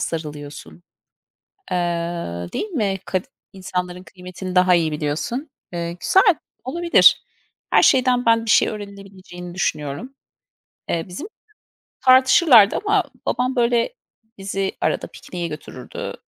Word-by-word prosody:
sarılıyorsun. 150 0 -6 0.9
Eee, 180 - 0 0.8
değil 430 - -3
mi? 205 - -1
Kad 185 -1 -2 0.3
insanların 180 -1 -5
kıymetini 185 0 -8
daha 180 0 +5
iyi 160 -3 +1
biliyorsun. 155 - -3 0.2
Eee, 170 -1 -3
güzel. 375 - +4 0.3
Olabilir. 340 +7 +4 0.5
Her - - +5
şeyden 250 -2 +3
ben 230 0 +4
bir 225 - -2
şey - - +5
öğrenilebileceğini 195 -4 -9
düşünüyorum. 155 - -3 0.8
Eee, 165 -1 -1
bizim 235 - -7 0.7
tartışırlardı 255 - +6
ama 410 -2 +2 0.2
babam, 255 +1 0
böyle, 240 - +1 0.4
bizi 195 0 -2
arada - - 0
pikniğe 175 -2 -7
götürürdü. 140 -4 -8
195 Hz, 110 wpm, -21 LUFS, 175-250 Hz, 0.9 s, tartışırlardı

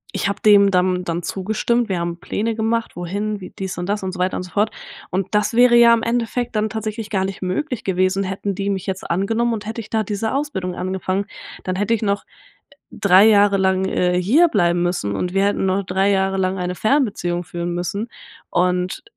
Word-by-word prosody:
ich - - 0
habe 200 - -3
dem 200 -2 +6
dann 180 0 +1
dann 170 0 -3
zugestimmt. 220 +5 -1
Wir 185 -2 -1
haben 170 0 -2
Pläne 220 +5 -2
gemacht, 225 +1 -1
wohin, 200 +4 -3
wie 185 - -8
dies 190 -1 -6
und 175 +1 -4
das 205 +1 0
und 190 -1 -4
so 185 - -8
weiter 185 +1 0
und - - -4
so 180 - -11
fort. 215 +1 +1 0.4
Und 190 +1 -1
das 210 +2 +1
wäre 245 0 +5
ja 235 0 +7
im 230 - +1
Endeffekt 240 0 -1
dann 215 0 +1
tatsächlich 220 0 -4
gar 190 -2 0
nicht 195 -1 -6
möglich 220 +8 -2
gewesen, 185 +1 +1
hätten 195 +1 -3
die 200 +1 -2
mich 195 -1 -2
jetzt 190 0 -4
angenommen, 225 +7 +1
und 210 -2 -5
hätte 225 +1 -4
ich 215 - -13
da 220 -1 0
diese 210 +2 -2
Ausbildung 265 -11 -2
angefangen, 190 +1 -2 0.4
dann 185 - -1
hätte 205 +4 0
ich 225 - 0
noch, 200 -2 0 0.7
3 195 0 +5
Jahre 205 -2 +5
lang, 190 0 +1
äh, 180 -1 +1
hierbleiben 200 - +3
müssen 175 - -1
und 180 - -2
wir 195 - +3
hätten 205 - 0
noch 190 +1 0
3 190 +2 +1
Jahre 195 -1 +1
lang 190 0 0
eine 180 0 -2
Fernbeziehung 205 -9 0
führen 175 0 -4
müssen. 180 +6 -3 0.4
Und 180 0 0
195 Hz, 210 wpm, -20 LUFS, 185-220 Hz, 0.7 s, ja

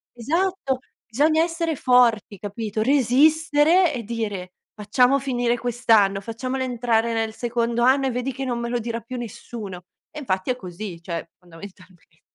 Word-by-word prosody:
Esatto, 310 +1 -1 0.3
bisogna 310 +7 +3
essere 330 -1 -2
forti, 240 -6 +3
capito, 215 +1 -4
resistere 295 +6 +4
e 240 -3 -4
dire: 205 -5 -4 0.2
"Facciamo 250 +6 +2
finire 245 -3 0
quest'anno, 225 -5 +2
facciamolo 255 +5 -4
entrare 235 -2 0
nel 225 -1 -1
secondo 235 0 -1
anno 265 +1 +4
e - - -1
vedi 250 +2 -3
che 270 +1 -4
non 240 -2 -2
me 235 0 -3
lo 245 0 -1
dirà 230 0 -4
più 250 +2 -7
nessuno." 210 -5 -8 0.3
E 300 - -7
infatti 190 -6 -2
è 250 - +2
così, 180 -4 -8
cioè 170 -1 -5
fondamentalmente. 180 -1 -15
235 Hz, 150 wpm, -23 LUFS, 210-265 Hz, 0.3 s, resistere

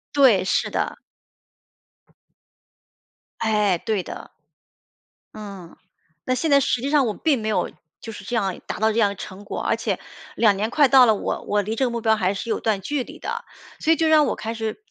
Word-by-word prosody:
对， 245 -10 +5
是 - - +1
的。 - - -2 2.4
哎， 210 -4 +2
对 215 +2 -1
的。 - - -9 1.0
嗯， 200 -5 -10 0.5
那 255 - +1
现 320 +5 -1
在 280 - +7
实 245 -2 0
际 275 - -2
上 290 -2 +3
我 215 - -1
并 280 0 0
没 215 - -2
有， 215 - 0 0.3
就 225 - -8
是 210 - -10
这 240 +5 -4
样 195 -5 -1
达 - - -5
到 220 +1 +3
这 225 - 0
样 205 -3 +4
的 200 - -6
成 190 +2 -9
果。 200 - -5
而 - - +1
且， - - -2 0.4
2 210 -3 +4
年 210 +3 -1
快 285 +2 +4
到 260 -1 +7
了， 220 -3 +4
我 - - -3
我 205 0 +1
离 215 +3 -3
这 265 - +1
个 - - 0
目 235 0 -3
标 220 -1 +3
还 190 -2 0
是 200 +4 -6
有 - - 0
一 - - -19
段 210 -3 0
距 290 +4 -2
离 - - -12
的。 - - -4 0.4
所 320 - +2
以 - - +6
就 325 0 +1
让 310 -1 +5
我 - - -1
开 225 0 -5
始 225 - -5
220 Hz, 225 characters per minute, -23 LUFS, 205-255 Hz, 2.4 s, 在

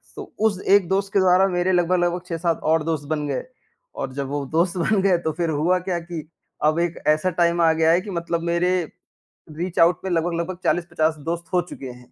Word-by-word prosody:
तो - - -6 0.2
उस 200 -4 +1
एक 195 -2 +5
दोस्त 195 +1 0
के 200 - +4
द्वारा 185 +1 +4
मेरे 180 0 0
लगभग-लगभग 175 0 +1
6-7 165 -1 -1
और 160 0 +2
दोस्त 155 -2 -2
बन 150 -1 -2
गए, 140 - -2 0.5
और 130 - -4
जब 140 0 -3
वो 140 +1 -3
दोस्त 170 +3 +1
बन 195 +3 +2
गए 190 -2 +3
तो 165 -2 -2
फिर 170 0 -1
हुआ 160 +4 +2
क्या 180 -1 -2
कि 170 -2 -7 0.4
अब 155 +2 +3
एक 170 0 -1
ऐसा 155 +4 +3
टाइम 170 0 +3
आ 165 -1 +5
गया 160 0 +3
है 175 +2 +3
कि 205 - -9
मतलब 170 -1 -2
मेरे 170 +1 +1 0.9
रीच 175 +1 -3
आउट 165 0 +5
में 190 - -2
लगभग-लगभग 170 +1 -1
40-50 165 -2 0
दोस्त 170 0 -3
हो 180 - +4
चुके 135 - -8
हैं। 125 0 -16
170 Hz, 215 wpm, -22 LUFS, 160-180 Hz, 0.9 s, एक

